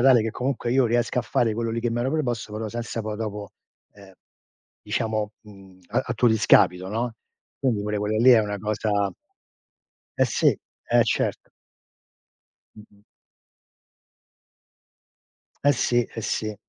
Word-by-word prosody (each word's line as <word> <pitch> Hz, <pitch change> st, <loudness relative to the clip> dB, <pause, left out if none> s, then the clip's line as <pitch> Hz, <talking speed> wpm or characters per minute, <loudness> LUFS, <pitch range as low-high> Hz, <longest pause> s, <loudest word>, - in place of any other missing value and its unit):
tale 125 Hz, -2 st, +6 dB
che 110 Hz, -, -2 dB
comunque 125 Hz, 0 st, -2 dB
io 130 Hz, -1 st, +4 dB
riesca 120 Hz, +1 st, 0 dB
a -, -, +1 dB
fare 115 Hz, -1 st, +1 dB
quello 115 Hz, +1 st, -2 dB
lì 115 Hz, +1 st, -2 dB
che 120 Hz, 0 st, -1 dB
mi 120 Hz, +1 st, -1 dB
ero 130 Hz, +2 st, 0 dB
preposto, 120 Hz, -8 st, -2 dB
però 110 Hz, 0 st, -3 dB
senza 115 Hz, 0 st, -4 dB
poi 110 Hz, 0 st, -4 dB
dopo, 105 Hz, -3 st, -5 dB, 0.5 s
ehm, 100 Hz, -1 st, -15 dB, 0.7 s
diciamo, 110 Hz, -2 st, -2 dB
mhmm, 95 Hz, -3 st, -16 dB
a -, -, -1 dB
tuo 120 Hz, -, +3 dB
discapito, 95 Hz, -4 st, +4 dB
no, 115 Hz, +3 st, -2 dB, 0.5 s
quindi 120 Hz, -7 st, 0 dB
pure 105 Hz, 0 st, -2 dB
quella 105 Hz, +1 st, -1 dB
lì 120 Hz, +4 st, +6 dB
è 120 Hz, -, +8 dB
una 105 Hz, -1 st, -3 dB
cosa 105 Hz, -1 st, -1 dB, 1.1 s
Eh -, -, +5 dB
sì, -, -, 0 dB, 0.4 s
e -, -, +3 dB
certo. -, -, -1 dB, 1.3 s
Mh-mh. 105 Hz, -1 st, -17 dB, 2.6 s
Eh 145 Hz, -, +4 dB
sì 120 Hz, -2 st, +2 dB
eh -, -, -6 dB
sì. 110 Hz, 0 st, -2 dB
110 Hz, 145 wpm, -24 LUFS, 105-120 Hz, 2.6 s, è